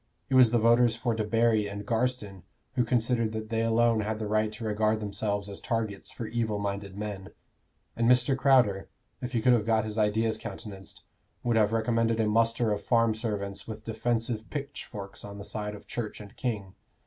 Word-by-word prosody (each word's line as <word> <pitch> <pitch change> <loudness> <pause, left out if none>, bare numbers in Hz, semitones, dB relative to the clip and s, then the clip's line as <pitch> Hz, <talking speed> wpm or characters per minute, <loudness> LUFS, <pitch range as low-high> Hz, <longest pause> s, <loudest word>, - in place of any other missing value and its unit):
It - - -2
was 130 -2 +7
the 120 - +2
voters 115 +1 +4
for 115 0 -1
Debarry 110 -1 +2
and 100 0 -6
Garstin 115 -4 -1 0.3
who 125 - +2
considered 115 -1 +1
that 110 0 -5
they 115 -1 0
alone 115 0 +3
had 110 +1 -1
the 110 - -4
right 110 +1 +1
to 110 - -7
regard 110 0 +1
themselves 100 -1 -2
as 100 -1 -7
targets 110 -4 -3
for 115 - -6
evil 110 -2 -1
minded 100 -1 -4
men; 105 -2 -5 0.7
and 115 0 +2
Mr. 125 +2 +4
Crowder, 125 -8 +3 0.3
if 125 0 -5
he 115 -2 0
could 125 - +6
have 115 -3 +1
got 110 -1 +3
his 110 +1 -3
ideas 110 +1 +1
countenanced, 95 -5 -8 0.4
would 120 -1 +1
have 105 -1 +4
recommended 115 0 +1
a 110 - +3
muster 115 +1 +2
of 105 0 -1
farm 115 +1 +3
servants 105 -3 -3
with 110 -1 -7
defensive 115 0 -2
pitchforks 135 -8 -6
on 100 0 -8
the 100 - -8
side 105 -1 -4
of 105 - -13
Church 115 -3 -4
and 105 +3 -11
king. 105 -7 -3
110 Hz, 190 wpm, -28 LUFS, 105-115 Hz, 0.7 s, was